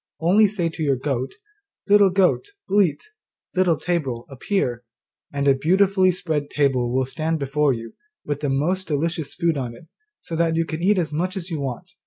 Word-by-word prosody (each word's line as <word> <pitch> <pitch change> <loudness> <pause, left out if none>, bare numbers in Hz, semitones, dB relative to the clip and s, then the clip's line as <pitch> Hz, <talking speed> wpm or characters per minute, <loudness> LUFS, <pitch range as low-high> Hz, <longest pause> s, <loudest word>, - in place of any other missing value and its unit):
Only 195 +6 +5
say 190 -4 -1
to 160 0 -6
your 140 -3 +2
goat, 130 -1 -3 0.5
"Little 205 -1 +6
goat, 190 - +2 0.2
bleat, 190 -7 +2 0.5
Little 180 -4 +3
table, 140 -10 -2
appear," 130 - -1 0.5
and 140 0 -1
a 140 - +7
beautifully 185 +6 +3
spread 160 -5 -2
table 130 -4 +1
will 130 +1 +1
stand 160 +5 -2
before 145 0 +1
you, 115 -2 -5 0.3
with 145 -1 -2
the 145 -1 -1
most 175 +8 0
delicious 160 0 -2
food 165 -3 +1
on 120 -3 -4
it, 140 - -15 0.3
so 165 - -6
that 165 0 +1
you 165 0 +1
can 160 0 -5
eat 200 +3 +3
as 160 -4 -1
much 180 +5 -1
as 185 -1 -5
you 160 - -2
want. 140 +7 -5
160 Hz, 185 wpm, -23 LUFS, 140-185 Hz, 0.5 s, a